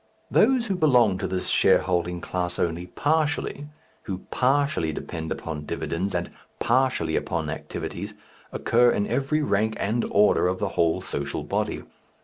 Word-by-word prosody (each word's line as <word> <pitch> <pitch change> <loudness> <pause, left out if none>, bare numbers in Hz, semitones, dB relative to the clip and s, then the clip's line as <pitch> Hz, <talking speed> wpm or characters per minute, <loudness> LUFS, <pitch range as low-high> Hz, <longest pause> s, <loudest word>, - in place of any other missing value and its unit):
Those 260 -3 +4
who 200 -4 -1
belong 125 - +4
to 95 - -2
this 95 0 -3
shareholding 90 -1 +2
class 90 0 -3
only 85 +1 -1
partially, 150 - -1 0.4
who 95 -1 -4
partially 135 - +1
depend 80 +1 -6
upon 75 -2 -5
dividends 95 +3 -2
and 85 0 -2 0.3
partially 125 -10 +1
upon - - -1
activities, - - -6 0.4
occur 120 +1 +3
in 100 - +1
every 145 +5 0
rank 110 -2 +1
and 110 +4 0
order 105 -3 +4
of 90 +1 0
the 100 - -1
whole 85 -2 +1
social 70 0 -4
body. - - -2
100 Hz, 140 wpm, -25 LUFS, 85-135 Hz, 0.4 s, Those